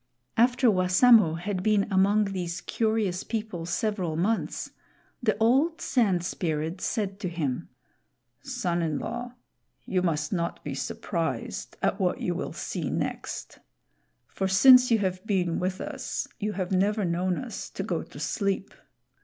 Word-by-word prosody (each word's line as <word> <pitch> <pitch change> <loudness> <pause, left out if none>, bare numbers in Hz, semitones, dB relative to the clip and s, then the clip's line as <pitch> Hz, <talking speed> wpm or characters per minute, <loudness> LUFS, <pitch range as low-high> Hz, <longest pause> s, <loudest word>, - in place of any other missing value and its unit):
After 245 +1 +4
Wassamo 185 0 +5
had 185 +2 -3
been 210 0 +3
among 200 +2 +4
these 175 -2 -3
curious 215 -5 0
people 215 -7 -4
several 185 -4 -1
months, 205 +8 -1 0.5
the 215 -4 +1
old 270 +9 +3
Sand 195 -9 +1
Spirit 165 0 -2
said 200 -4 -2
to 185 - -2
him: 150 -7 -3 0.7
"Son 225 -11 -2
in 155 -3 -1
law, 245 +1 -5 0.5
you 185 - 0
must 155 -3 0
not 170 -2 -2
be 145 - -4
surprised 135 - -3
at - - +1
what - - +1
you - - -1
will - - -4
see - - -4
next; - - -4 0.7
for 190 - -2
since 250 +6 +7
you 230 - +5
have 185 -2 -2
been 180 -5 +1
with 185 +1 -2
us 280 -1 -4
you 210 -1 -2
have 185 -2 -3
never 200 +2 +2
known 180 +1 0
us 250 -3 -6
to - - -5
go - - -1
to - - -11
sleep. 200 -1 -1
190 Hz, 145 wpm, -27 LUFS, 175-225 Hz, 0.7 s, since